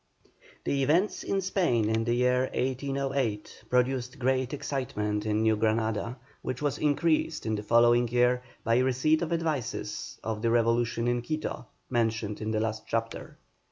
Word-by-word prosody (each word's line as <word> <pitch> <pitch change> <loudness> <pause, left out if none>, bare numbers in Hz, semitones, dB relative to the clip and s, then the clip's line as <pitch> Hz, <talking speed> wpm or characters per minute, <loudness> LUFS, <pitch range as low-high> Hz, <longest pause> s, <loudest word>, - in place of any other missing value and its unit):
The 140 - 0
events 165 +10 +2
in 195 - -1
Spain 175 - +1
in 110 +1 +1
the 120 +1 +1
year 125 +1 +2
1808 135 -4 -2
produced 125 +1 +1
great 130 -1 0
excitement 110 -7 -2
in 105 +1 +1
New 110 -1 +4
Granada, 110 +2 0 0.2
which 130 - -4
was 145 -1 -1
increased 155 0 +1
in 110 - 0
the 105 - -1
following 120 +2 +4
year 125 +1 +2 0.2
by 115 +2 +3
receipt 130 +5 +2
of 170 -1 -2
advices 160 -7 -3
of 110 -1 -3
the 115 - +1
revolution 115 0 +2
in 120 0 +1
Quito, 155 -3 -4 0.2
mentioned 115 -3 -1
in 110 - -2
the 110 -1 0
last 110 0 -3
chapter. 115 0 -3
120 Hz, 155 wpm, -28 LUFS, 115-135 Hz, 0.2 s, New